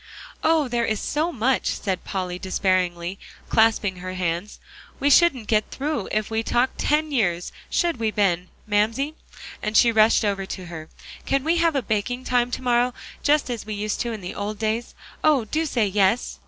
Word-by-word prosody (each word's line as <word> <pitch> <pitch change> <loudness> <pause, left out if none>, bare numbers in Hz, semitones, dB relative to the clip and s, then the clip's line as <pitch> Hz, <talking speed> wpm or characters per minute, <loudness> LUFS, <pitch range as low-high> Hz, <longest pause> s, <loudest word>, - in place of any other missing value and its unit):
"Oh! 315 -3 +3
there 240 -1 0
is 220 -2 0
so 315 +4 -1
much," 260 -2 0
said 190 -3 -2
Polly 180 -2 -4
despairingly, 185 -1 0 0.3
clasping 220 -4 +3
her 185 +1 -6
hands, 180 +2 -2 0.4
"we 285 +1 +2
shouldn't 275 -7 +5
get 215 0 +1
through 285 -6 -3
if 215 0 -1
we 220 0 +1
talked 245 +3 0
ten 305 +1 +1
years, 180 -10 0 0.2
should 340 -4 +1
we, 225 -1 0
Ben? 185 -4 +1 0.2
Mamsie," 220 +8 +1 0.5
and 215 0 0
she 235 - +6
rushed 220 0 +4
over 195 -2 -1
to 185 -1 -6
her, 160 -2 -8 0.4
"can 275 -1 +1
we 330 +3 +2
have 335 -2 +2
a 270 - +1
baking 225 +4 -2
time 245 -1 +1
to 255 - -4
morrow, 245 0 +2 0.3
just 295 0 +3
as 235 -3 -4
we 215 0 -5
used 210 +1 -2
to 235 - -1
in 220 -3 -6
the 180 - -6
old 205 +1 -4
days? 225 +2 -2 0.3
Oh! 290 -7 +4
do 315 +8 -1
say 240 -6 +1
yes." 200 +3 +1
220 Hz, 185 wpm, -23 LUFS, 195-260 Hz, 0.5 s, she